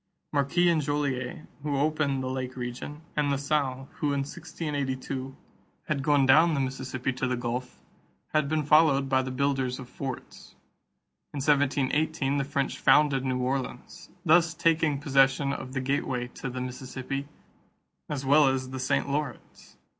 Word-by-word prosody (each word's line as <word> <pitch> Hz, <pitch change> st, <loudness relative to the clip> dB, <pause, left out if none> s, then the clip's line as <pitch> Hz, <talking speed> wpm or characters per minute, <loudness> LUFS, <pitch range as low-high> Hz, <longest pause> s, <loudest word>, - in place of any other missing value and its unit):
Marquette 145 Hz, +5 st, +2 dB
and 170 Hz, -3 st, +4 dB
Joliet, 140 Hz, -2 st, -2 dB, 0.2 s
who 145 Hz, -1 st, -1 dB
opened 145 Hz, -2 st, +1 dB
the -, -, -2 dB
Lake 130 Hz, 0 st, -4 dB
region, 125 Hz, +5 st, -6 dB
and 150 Hz, -1 st, +1 dB
La 140 Hz, -, +2 dB
Salle, 140 Hz, -2 st, -1 dB
who 155 Hz, -, -1 dB
in 140 Hz, -, 0 dB
1682 140 Hz, -4 st, -4 dB, 0.5 s
had 150 Hz, -3 st, 0 dB
gone 145 Hz, -1 st, +3 dB
down 155 Hz, +5 st, +6 dB
the -, -, 0 dB
Mississippi 130 Hz, -1 st, -2 dB
to 130 Hz, +1 st, -2 dB
the 125 Hz, -1 st, -1 dB
Gulf, 125 Hz, +1 st, -4 dB, 0.5 s
had 155 Hz, -2 st, +2 dB
been 155 Hz, 0 st, +1 dB
followed 145 Hz, -2 st, +5 dB
by 130 Hz, -1 st, +3 dB
the 130 Hz, -, -4 dB
builders 130 Hz, -1 st, 0 dB
of 130 Hz, -, -9 dB
forts. 130 Hz, 0 st, -7 dB, 0.8 s
In -, -, -3 dB
1718, 145 Hz, +1 st, +1 dB
the 140 Hz, -, +1 dB
French 140 Hz, -1 st, -2 dB
founded 145 Hz, -3 st, +4 dB
New 130 Hz, -1 st, 0 dB
Orleans, 130 Hz, +1 st, -4 dB, 0.2 s
thus 165 Hz, +1 st, +4 dB
taking 160 Hz, -3 st, +2 dB
possession 140 Hz, 0 st, +3 dB
of 130 Hz, 0 st, -6 dB
the 135 Hz, -, -1 dB
gateway 130 Hz, -2 st, -1 dB
to 135 Hz, -, -6 dB
the 125 Hz, +1 st, -5 dB
Mississippi 130 Hz, +2 st, -5 dB, 0.8 s
as 140 Hz, -2 st, -3 dB
well 145 Hz, +1 st, +6 dB
as 130 Hz, -1 st, -1 dB
the 130 Hz, -, -5 dB
St. 130 Hz, -, 0 dB
Lawrence. 140 Hz, -3 st, -5 dB
140 Hz, 155 wpm, -28 LUFS, 130-150 Hz, 0.8 s, down